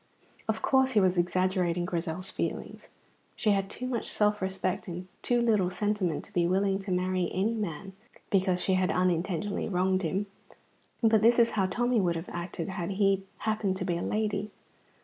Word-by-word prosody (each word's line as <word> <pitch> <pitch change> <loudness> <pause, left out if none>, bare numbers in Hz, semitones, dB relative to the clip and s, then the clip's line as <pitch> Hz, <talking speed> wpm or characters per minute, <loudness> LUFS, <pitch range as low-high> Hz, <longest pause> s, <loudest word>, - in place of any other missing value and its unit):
Of 220 0 -1
course 265 -1 +3
he 215 - +5
was 185 -2 +3
exaggerating 180 -1 +1
Grizel's 175 +1 -3
feelings. - - -4 0.5
She 215 - +1
had 195 -1 +1
too 250 - -5
much 250 -3 -2
self 210 -1 +1
respect 190 0 -2
and 180 +1 -6
too 240 -1 +2
little 210 -6 +3
sentiment 185 -3 -1
to - - -16
be 170 -1 +2
willing 195 +1 +1
to 195 -1 -5
marry 180 -1 0
any 200 +5 0
man 195 -3 -4 0.4
because 185 -2 +2
she 190 - +2
had 185 0 +2
unintentionally 180 +2 0
wronged 185 0 +1
him. 190 +4 -1 0.8
But 220 -2 +5
this 230 +2 +5
was 235 -1 +5
how 195 -3 +1
Tommy 240 +3 +1
would 175 -2 +1
have 165 +2 -5
acted 175 0 -5
had 190 -1 -3
he 195 -1 +2 0.2
happened 215 -3 0
to - - -3
be 175 - 0
a 170 - -3
lady. 210 -1 -1
190 Hz, 180 wpm, -29 LUFS, 180-210 Hz, 0.8 s, he